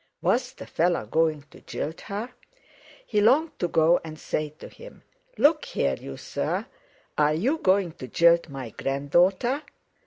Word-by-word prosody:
Was - - +1
the - - -10
fellow 170 -7 0
going 155 +4 +1
to - - -15
jilt 160 +2 -5
her? 210 +5 -5 0.7
He 210 - +1
longed 280 +9 +3
to 175 - +1
go 165 +1 +3
and 155 -1 -8
say 155 0 -2
to - - -10
him: - - -14 0.3
"Look 305 +1 +4
here, 70 - 0
you 70 - -7
sir! - - -3 0.5
Are 150 0 +4
you 260 - 0
going 190 - +2
to 130 - -9
jilt 170 +3 +4
my 135 -4 -7
grand 140 +5 -4
daughter?" 195 - +3
170 Hz, 160 wpm, -26 LUFS, 150-210 Hz, 0.7 s, Look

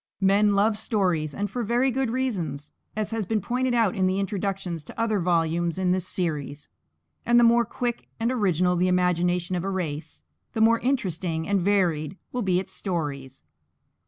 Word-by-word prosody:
Men 200 +1 +4
love 210 +1 +2
stories, 180 - 0
and 205 - -1
for 240 +5 -4
very 240 +4 +1
good 265 0 0
reasons, 195 - -3 0.2
as 215 0 -2
has 225 -1 -1
been 220 +1 +1
pointed 250 +4 -1
out 225 -5 +3
in 185 -1 +1
introductions 195 -3 -2
to - - -10
other 220 -3 +1
volumes 170 0 +1
in 185 -1 +1
this 185 0 0
series; 150 -5 -3 0.5
and 240 0 +4
the - - +5
more 235 0 +5
quick 240 +1 -3
and 230 +2 +1
original 185 -7 +2
the 180 +1 +2
imagination 180 0 +1
of 175 - -2
a 195 - -2
race, 165 -6 -4 0.3
the - - -3
more 230 +1 +5
interesting 180 - -1
and 200 -2 +1
varied 180 -4 +1
will 250 - -2
be 185 -4 +2
its 190 - -6
stories. 140 -8 -4
190 Hz, 175 wpm, -25 LUFS, 175-225 Hz, 0.5 s, the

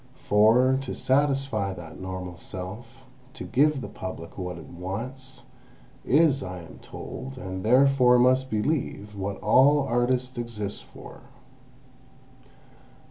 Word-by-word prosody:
For, 120 +6 +4
to 135 - -5
satisfy 135 -7 +1
that 85 -3 -10
normal 95 -1 -6
self, 110 +9 -8 0.3
to - - -7
give 145 +1 +2
the - - -5
Public 95 -3 -8
what 90 -2 -5
it - - -10
wants, 120 +10 -7 0.6
is, 145 0 +4
I 90 -4 -6
am 80 - -13
told, 130 +1 -8
and 95 -5 -6
therefore 125 +1 +5
must 130 +1 +3
believe, 105 -3 -2
what 100 0 -4
all 145 +3 +5
artists 125 0 0
exist 105 -4 -5
for. - - -13
120 Hz, 120 wpm, -26 LUFS, 95-130 Hz, 0.6 s, therefore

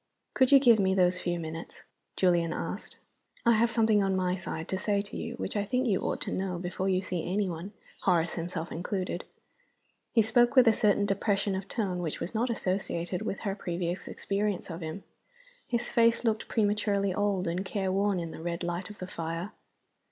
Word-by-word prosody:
"Could 260 0 +3
you 280 - +10
give 240 -5 +6
me 190 -1 +3
those 180 -1 +3
few 175 -1 -1
minutes?" 165 0 -7 0.3
Julian 170 -3 +2
asked. - - -5 0.5
"I 235 - +6
have 230 +1 +4
something 220 -3 +3
on 195 -1 +1
my 185 -1 +1
side 175 -3 -4
to 190 - -1
say 205 0 +1
to 200 0 -6
you 235 +1 -4
which - - -4
I 205 - +1
think 250 +5 0
you 200 -6 +2
ought - - -1
to - - -3
know 185 -2 -2
before 180 +2 -2
you 185 0 +1
see 180 -3 -2
any 200 +1 +1
one 175 +3 -5 0.3
Horace 170 -3 +2
himself 165 0 -4
included." 185 +2 -3 0.9
He 225 - +4
spoke 240 +4 +3
with 255 -2 +7
a 225 - +7
certain 205 -1 +3
depression 200 0 0
of 190 +1 -4
tone 195 -6 -2
which 165 -4 -3
was 180 - -4
not 235 +3 0
associated 185 -4 -1
with 195 - -3
her 200 -3 -1
previous 175 -2 -3
experience 200 -2 -2
of 165 +2 -6
him. 160 +4 -5 0.6
His 235 -2 0
face 230 0 +3
looked 220 -2 0
prematurely 205 -2 +1
old 200 -2 0
and 175 +3 -1
careworn 195 0 0
in 165 -1 -4
the - - -8
red 170 +1 -3
light 175 +3 -3
of 210 - -10
the 185 - -5
fire. 165 +2 -4
195 Hz, 195 wpm, -29 LUFS, 175-210 Hz, 0.9 s, you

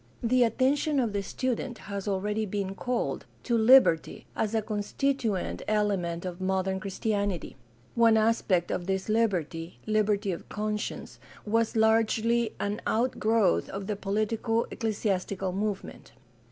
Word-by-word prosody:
The 250 +2 +4
attention 270 +5 +2
of 230 -5 0
the 200 - 0
student 245 +3 -3
has 200 -1 -6
already 210 +2 -1
been 195 -1 -3
called 245 +5 -2 0.2
to 240 - 0
liberty 225 -7 +5
as 220 0 -1
a 220 - +2
constituent 215 0 -1
element 195 -5 0
of 180 0 -6
modern 190 0 0
Christianity. 200 -1 -2 0.4
One 230 -1 +5
aspect 215 -5 +2
of 175 - -3
this 190 0 -1
Hberty 180 -7 0
— - - -28
liberty 210 -2 +1
of 170 - -7
conscience 210 0 -4
— - - -21
^was 225 +2 +1
largely 225 +1 +2
an 205 +1 -2
out 240 +3 0
growth 215 - +2
of 195 0 -5
the 210 - -2
politico 215 +3 0
ecclesiastical 200 -4 -2
movement. 205 0 -4
210 Hz, 140 wpm, -28 LUFS, 195-225 Hz, 0.4 s, liberty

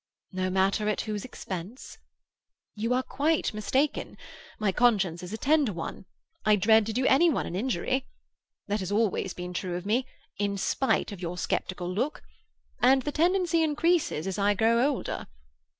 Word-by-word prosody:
"No 185 -1 -1
matter 195 +3 +1
at 210 - 0
whose 210 -2 -4
expense?" 200 -1 -7 0.7
"You 225 +3 -2
are 255 - +1
quite 305 +1 0
mistaken. 260 +7 -1 0.4
My 210 -2 +1
conscience 195 -7 +2
is 180 +1 -8
a 220 - -4
tender 290 -2 +2
one. 170 +1 -6 0.4
I 215 -1 +5
dread 220 +2 +4
to - - -1
do 255 +3 0
any 325 +7 +5
one 300 - 0
an 175 - -5
injury. 255 +4 -1 0.6
That 205 +1 -1
has 190 0 -4
always 205 -3 0
been 180 0 -6
true 180 0 -3
of 180 +1 -5
me, 245 +5 +1 0.3
in 200 -1 0
spite 260 +4 0
of 195 -3 -8
your 175 0 -4
sceptical 180 0 -2
look; 255 +10 -2 0.6
and 260 +1 +5
the 295 - -2
tendency 345 +2 +2
increases 315 - +1
as 190 +1 -3
I 205 +1 +3
grow 230 +3 +3
older. 280 - -4
215 Hz, 165 wpm, -28 LUFS, 190-265 Hz, 0.7 s, I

